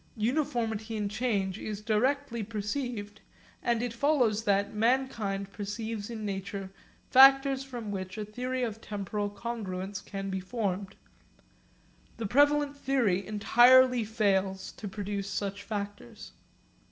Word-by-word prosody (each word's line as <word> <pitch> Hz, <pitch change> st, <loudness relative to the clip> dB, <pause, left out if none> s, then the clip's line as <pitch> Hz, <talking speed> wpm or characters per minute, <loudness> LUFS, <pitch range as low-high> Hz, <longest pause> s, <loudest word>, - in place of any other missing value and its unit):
Uniformity 225 Hz, -3 st, -1 dB
in 210 Hz, -1 st, -1 dB
change 205 Hz, -4 st, -1 dB
is 210 Hz, -2 st, -5 dB
directly 235 Hz, +3 st, 0 dB
perceived, 210 Hz, 0 st, -4 dB, 0.4 s
and 235 Hz, -1 st, +1 dB
it 245 Hz, -2 st, -2 dB
follows 235 Hz, -5 st, +2 dB
that 200 Hz, 0 st, +2 dB
mankind 215 Hz, -4 st, 0 dB
perceives 210 Hz, +1 st, -4 dB
in 220 Hz, -2 st, -5 dB
nature 195 Hz, -1 st, -4 dB, 0.4 s
factors 270 Hz, 0 st, +7 dB
from 240 Hz, -6 st, -6 dB
which 185 Hz, -1 st, -5 dB
a 215 Hz, -, -3 dB
theory 250 Hz, +4 st, -3 dB
of 225 Hz, -2 st, -3 dB
temporal 205 Hz, 0 st, -3 dB
congruence 200 Hz, -3 st, -5 dB
can 195 Hz, -1 st, -5 dB
be 190 Hz, -, -2 dB
formed. 195 Hz, -1 st, -3 dB, 1.2 s
The 230 Hz, -, -3 dB
prevalent 290 Hz, +5 st, +3 dB
theory 245 Hz, -9 st, +1 dB
entirely 245 Hz, +4 st, +6 dB
fails 195 Hz, -3 st, 0 dB
to 210 Hz, -, -8 dB
produce 200 Hz, 0 st, -4 dB
such 200 Hz, 0 st, -3 dB
factors. 205 Hz, +2 st, -6 dB
215 Hz, 120 wpm, -29 LUFS, 200-245 Hz, 1.2 s, factors